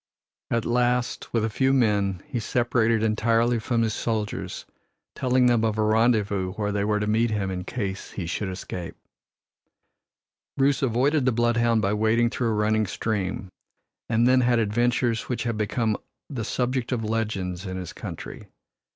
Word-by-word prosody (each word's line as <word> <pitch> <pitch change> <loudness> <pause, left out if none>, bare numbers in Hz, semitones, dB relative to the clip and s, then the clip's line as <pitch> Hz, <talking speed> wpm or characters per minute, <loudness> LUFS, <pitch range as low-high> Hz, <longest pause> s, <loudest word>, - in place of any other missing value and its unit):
At 115 -1 0
last, 125 +1 0
with 115 -2 +1
a - - -1
few 130 +5 +2
men, 100 -7 +1
he 130 -5 -3
separated 115 -1 +1
entirely 115 +2 +2
from 115 +1 0
his 110 -1 0
soldiers, 110 -2 -3 0.5
telling 130 0 +2
them 120 -2 +3
of 110 -1 0
a 110 - +2
rendezvous 105 -4 +2
where 105 0 -2
they 100 0 0
were 105 0 +1
to 105 - -1
meet 110 +2 +2
him 100 -3 -1
in 90 -1 -4
case 100 -5 -4
he 95 - -4
should 90 +4 -3
escape. 90 -2 -6 1.6
Bruce 135 -1 +2
avoided 135 +3 +2
the 130 - +4
bloodhound 120 -1 +2
by 100 +1 +1
wading 110 +2 +2
through 120 -2 -1
a - - +1
running 110 0 +1
stream, 95 -2 -3 0.6
and 115 +1 +3
then 130 0 +5
had 120 -1 +3
adventures 120 +2 +1
which 125 - -1
have 115 -1 -1
become 110 +1 0 0.3
the 130 -6 -4
subject 125 +2 -1
of 120 -3 -1
legends 105 -4 -2
in 95 0 -4
his 90 -2 -6
country. - - -8
115 Hz, 165 wpm, -25 LUFS, 105-120 Hz, 1.6 s, then